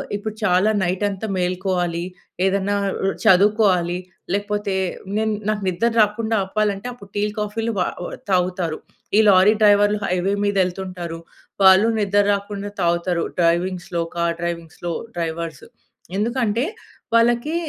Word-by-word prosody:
ఇప్పుడు 215 +1 -5
చాలా 190 +2 +3
నైట్ 185 +3 -1
అంతా 200 +3 -5
మేలుకోవాలి, 180 -1 -1 0.4
ఏదన్నా 200 +1 +1 0.2
ఆహ్, - - -3 0.3
చదువుకోవాలి 190 -3 +4 0.4
లేకపోతే 205 -1 -1 0.4
నేను 220 0 +1 0.2
నాకు 210 -2 -1
నిద్ర 185 +6 +1
రాకుండా 220 +2 +1
ఆపాలంటే 205 +2 -1
అప్పుడు 200 -5 -13
టీ 205 - 0 0.2
కాఫీలు 220 +2 -2
వా - - +2 0.5
తాగుతారు. 180 -3 0 0.4
ఈ - - +7
లారీ 195 +2 +6
డ్రైవర్లు 205 0 +5
హైవే 185 +2 0
మీద 205 0 0
వెళ్తుంటారు. 180 -2 -5 0.4
వాళ్ళు 190 +3 +7
నిద్ర 205 0 +3
రాకుండా 200 0 -3
తాగుతారు. 170 0 +1 0.2
డ్రైవింగ్స్‌లో, 175 0 0
కార్ 170 0 0
డ్రైవింగ్స్‌లో 170 0 -4 0.3
డ్రైవర్స్. 165 -2 -4 0.5
ఎందుకంటే 235 +1 0 0.5
వాళ్ళకి 240 +7 +2
195 Hz, 120 wpm, -21 LUFS, 175-210 Hz, 0.5 s, ఈ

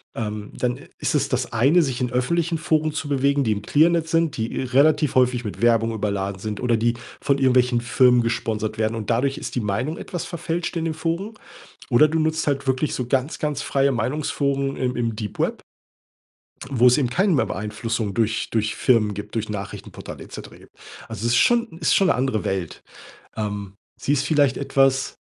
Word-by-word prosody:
ähm, 105 -2 -4
dann 125 -1 -1
i - - -14
ist - - -1
es - - +1
das - - -2
eine, 140 +10 +4
sich 130 -4 -3
in 125 0 -1
öffentlichen 165 +7 0
Foren 155 0 +1
zu 160 -1 -4
bewegen, 140 0 +2
die 110 - +1
im 105 -1 -1
Clearnet 165 +4 +3
sind, 165 -3 +1
die 110 0 -2
eh - - -1
relativ 140 +3 +3
häufig 125 -2 +2
mit 105 0 -6
Werbung 115 -1 +3
überladen 100 -2 -2
sind 105 +1 -5
oder 120 -2 +2
die 115 +1 +1 0.3
von 140 0 +2
irgendwelchen 125 -2 +3
Firmen 120 0 +4
gesponsert 110 -1 -2
werden 110 +1 0
und 110 0 -3
dadurch 135 +4 +1
ist - - -6
die - - -1
Meinung 115 +10 -2
etwas 175 - -5
verfälscht 170 0 -3
in 165 - -2
den 160 - -2
Foren. 170 +7 -3 0.6
Oder 130 +4 +6
du 160 +2 0
nutzt 160 0 0
halt 140 -1 -1
wirklich 130 +2 0
so 125 - -3
ganz, 135 +4 -1
ganz 150 -2 -2
freie 140 0 +1
Meinungsforen 140 +2 -1
im 125 -1 -1
im 115 -2 -2
Deep 105 -2 -6
Web, - - -1 1.1
wo 125 -2 +3
es 125 - +6
eben 125 -4 0
keinen 190 +7 +2
mehr 130 -6 +2
Beeinflussung 105 +1 -3
durch 115 -1 0
durch 110 -1 0
Firmen 110 -5 +2
gibt, 105 +1 -8
durch 110 -1 -2
Nachrichtenportal 100 -1 -7
et - - -14
cetera - - -9
gibt. - - -19 0.3
Also 115 - -5
ist 120 +1 +3
schon 235 - +3
ist 160 - +3
schon 195 - +4
'ne - - +4
andere 125 -6 -1
Welt. 95 -4 -3 0.6
Ähm, 100 -2 -4 0.3
sie 145 - 0
ist 140 -1 0
vielleicht 145 -4 +2
etwas 135 -1 +1
125 Hz, 200 wpm, -23 LUFS, 110-145 Hz, 1.1 s, Oder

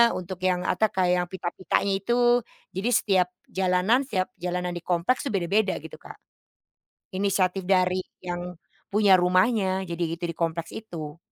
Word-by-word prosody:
untuk 185 0 -6
yang 180 -1 +1
atau 200 +4 +2
kayak 180 -1 +1
yang 175 - -7
pita-pitanya 185 +2 -1
itu. 240 +2 +3 0.3
Jadi 195 +6 0
setiap 185 -3 +3 0.2
jalanan 190 +7 +2
setiap 185 -7 -1
jalanan 180 0 -2
di - - -3
kompleks 185 +11 0
tuh 225 - -3
beda-beda, 195 +3 +1
gitu, - - -9
Kak. - - -11 1.0
Inisiatif 190 -1 0
dari 185 -1 +2 0.2
yang 175 0 -5 0.4
punya 205 -1 +5
rumahnya 190 +1 +2
jadi 170 0 -3 0.2
itu - - -29
di - - -7
kompleks 165 0 -2
itu. 165 -8 -7
185 Hz, 150 wpm, -26 LUFS, 180-200 Hz, 1.0 s, punya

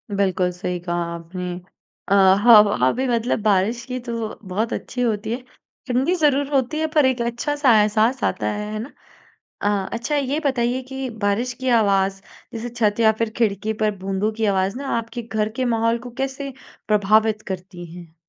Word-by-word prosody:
बिल्कुल 185 -2 +1
सही 180 0 -4
कहा 175 0 -2
आपने। 180 +2 -6 0.5
अ, - - -8
ह 190 -1 +6
हाँ 230 -3 +9
वही 205 - +1
मतलब 240 0 0
बारिश 215 +3 +2
की 255 0 -4
तो 230 -3 -5
बहुत 210 +5 -2
अच्छी 250 - -4
होती 220 -2 -1
है। 245 +2 -3 0.5
ठंडी 260 +8 +1
ज़रूर 285 -4 +2
होती 270 +3 +1
है 315 - +1
पर 300 -3 +5
एक 255 -2 +1
अच्छा-सा 255 +4 +1
एहसास 220 +5 +1
आता - - 0
है, 210 0 -4
है 215 - -3
ना? 245 +6 -7 0.7
अ, 200 -2 0
अच्छा 235 +6 -2
ये 280 +2 0
बताइए 250 -1 0
कि 265 0 -4 0.2
बारिश 230 +5 0
की 260 - -1
आवाज़ 195 -2 +1 0.3
जैसे 230 +1 -5
छत 230 -2 0
या 220 -1 +5
फ़िर 230 -1 +1
खिड़की 215 -1 0
पर 215 - +3
बूंदों 195 +3 -1
की 220 0 -1
आवाज़ 190 +3 0
ना 280 - -5
आपके 230 +1 -6
घर 220 -2 -1
के 260 - 0
माहौल 230 -1 +1
को - - -10
कैसे 270 +1 -4 0.4
प्रभावित 215 +1 +3
करती 185 -1 -6
है? 170 -2 -12
225 Hz, 180 wpm, -22 LUFS, 200-250 Hz, 0.7 s, हाँ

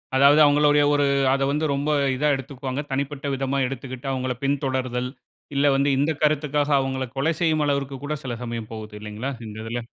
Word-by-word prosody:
அதாவது, 140 +3 +6
அவுங்ளுடைய 145 0 +4
ஒரு, 145 -1 +3 0.3
அதை 135 0 +1
வந்து 150 +2 0
ரொம்ப 140 +2 -1 0.3
இதா 150 +4 +1
எடுத்துக்குவாங்க. 135 +1 -5
தனிப்பட்ட 140 +1 -3
விதமா 135 +1 -1
எடுத்துக்கிட்டு, 130 0 -7
அவுங்கள 130 -1 -1
பின்தொடர்தல். 130 -3 -1 0.5
இல்ல 140 +1 +3
வந்து, 140 +1 +2
இந்த 145 +3 +2
கருத்துக்காக 150 -1 +1
அவுங்கள 130 -1 -2
கொலை 160 +5 +1
செய்யும் 155 -3 +2
அளவிற்கு 140 -1 -1
கூட 150 +1 -2
சில 125 -3 -3
சமயம் 115 -2 -5
போகுது. 110 -1 -8
இல்லைங்களா, 105 +6 -4 0.2
இந்த 105 0 -8
இதுல. 115 +1 -4
135 Hz, 170 wpm, -24 LUFS, 130-145 Hz, 0.5 s, அதாவது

